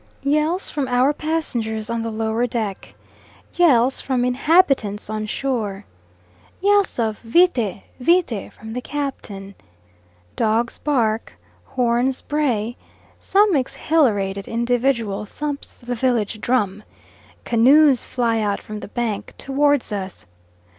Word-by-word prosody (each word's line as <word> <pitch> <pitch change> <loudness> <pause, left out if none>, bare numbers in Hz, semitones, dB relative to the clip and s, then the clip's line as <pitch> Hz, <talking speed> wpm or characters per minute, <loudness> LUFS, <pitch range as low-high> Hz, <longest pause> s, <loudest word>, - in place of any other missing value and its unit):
Yells 305 +6 0
from 285 -3 -2
our 255 +3 +3
passengers 240 -9 -2
on 230 0 -2
the 230 - -3
lower 220 +2 -1
deck. 220 -5 -4 0.6
Yells 265 -7 +3
from 255 -2 0
inhabitants 250 - +2
on 215 0 -3
shore. 215 -6 -2 0.7
Yells 405 0 +2
of 220 -3 -1
vite, 235 - +2 0.2
vite 285 - +1
from 220 0 -10
the 250 - -3
Captain. 235 -9 -5 0.8
Dogs 225 +1 0
bark, 230 -7 0 0.3
horns 250 0 0
bray, 245 -7 -1 0.4
some 405 -2 +3
exhilarated 220 -8 +1
individual 235 -3 0
thumps 290 +4 -5
the 245 0 -5
village 230 -3 0
drum, 210 -5 0 0.6
canoes 265 +3 +5
fly 230 -3 0
out 205 -2 0
from 215 0 -8
the - - -8
bank 225 -2 -3
towards 285 -2 +1
us. 195 -2 -5
240 Hz, 115 wpm, -21 LUFS, 215-280 Hz, 0.8 s, canoes